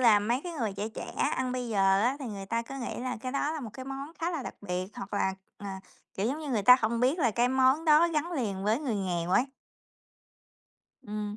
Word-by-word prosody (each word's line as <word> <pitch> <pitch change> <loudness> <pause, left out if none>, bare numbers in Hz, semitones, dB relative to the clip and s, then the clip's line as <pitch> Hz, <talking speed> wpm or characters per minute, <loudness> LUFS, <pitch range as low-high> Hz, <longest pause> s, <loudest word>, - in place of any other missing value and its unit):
là, 230 -4 +7
mấy 235 +5 0
cái 350 - -4
người 230 -10 -2
trẻ 205 +2 -2
trẻ 220 - -7 0.2
ăn 255 -1 -1
bây 250 -1 -3
giờ 195 -2 +3
á, 245 +5 +2
thì 270 - -4
người 200 -3 -6
ta 230 +3 -1
cứ 270 +4 -9
nghĩ 245 - -4
là 250 0 -3
cái 255 +1 -4
đó 290 +2 0
là 315 - -4
một 230 - -6
cái 260 - -8
món 275 +3 -6
khá 335 +1 -1
là 325 -6 -3
đặc - - -6
biệt, 185 -2 -3
hoặc 245 -3 -6
là, 190 -1 +1 0.2
ờ, 205 - -8 0.5
kiểu 195 - -1
giống 275 +6 -1
như, 305 -2 -6
người 220 -5 +1
ta 250 +5 +9
hông 230 +1 0
biết 260 +7 +3
là 250 -8 +3
cái 240 +3 +2
món 265 +4 +3
đó 315 +2 +6
gắn 330 +2 -1
liền 205 - -2
với 215 +3 +2
người 265 -7 -1
nghèo 180 -3 -1
ấy. 215 - +4 1.6
Ừm. 210 -2 -4
245 Hz, 250 wpm, -29 LUFS, 205-270 Hz, 1.6 s, ta